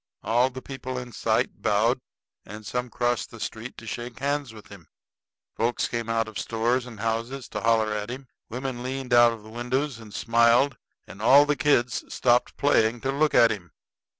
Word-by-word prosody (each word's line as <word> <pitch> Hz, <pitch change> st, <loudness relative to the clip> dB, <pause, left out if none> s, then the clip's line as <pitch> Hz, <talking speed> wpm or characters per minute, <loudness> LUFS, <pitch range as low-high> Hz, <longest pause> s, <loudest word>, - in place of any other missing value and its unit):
All 120 Hz, +4 st, +3 dB
the 130 Hz, 0 st, -9 dB
people 130 Hz, -1 st, -6 dB
in 125 Hz, -1 st, -6 dB
sight -, -, -1 dB
bowed, -, -, +2 dB, 0.4 s
and 105 Hz, +2 st, -10 dB
some 125 Hz, +5 st, -3 dB
crossed 120 Hz, +1 st, -1 dB
the 115 Hz, -, -12 dB
street 115 Hz, +3 st, -6 dB
to 115 Hz, -, -10 dB
shake 120 Hz, +1 st, -6 dB
hands 140 Hz, 0 st, -2 dB
with 110 Hz, -2 st, -13 dB
him; 95 Hz, -6 st, -13 dB, 0.7 s
folks 120 Hz, +1 st, 0 dB
came 115 Hz, -1 st, -4 dB
out 115 Hz, -1 st, +1 dB
of 110 Hz, -, -6 dB
stores 120 Hz, +2 st, 0 dB
and 110 Hz, -4 st, -10 dB
houses 115 Hz, +4 st, -2 dB
to -, -, -4 dB
holler 110 Hz, -2 st, +2 dB
at 105 Hz, +1 st, -4 dB
him; 130 Hz, +2 st, -7 dB, 0.2 s
women 125 Hz, +1 st, -4 dB
leaned 130 Hz, 0 st, -4 dB
out 120 Hz, -1 st, +7 dB
of 115 Hz, -2 st, -8 dB
windows 125 Hz, +4 st, -3 dB
and 110 Hz, -2 st, -12 dB
smiled; 115 Hz, +5 st, +3 dB, 0.3 s
and 100 Hz, -, -12 dB
all 140 Hz, +6 st, +7 dB
the 150 Hz, 0 st, +1 dB
kids 125 Hz, -5 st, +1 dB
stopped 120 Hz, 0 st, +2 dB
playing 115 Hz, -5 st, +2 dB
to 135 Hz, -, -1 dB
look 150 Hz, +2 st, +1 dB
at 115 Hz, -, +6 dB
him. 90 Hz, -4 st, -7 dB
120 Hz, 185 wpm, -26 LUFS, 115-130 Hz, 0.7 s, out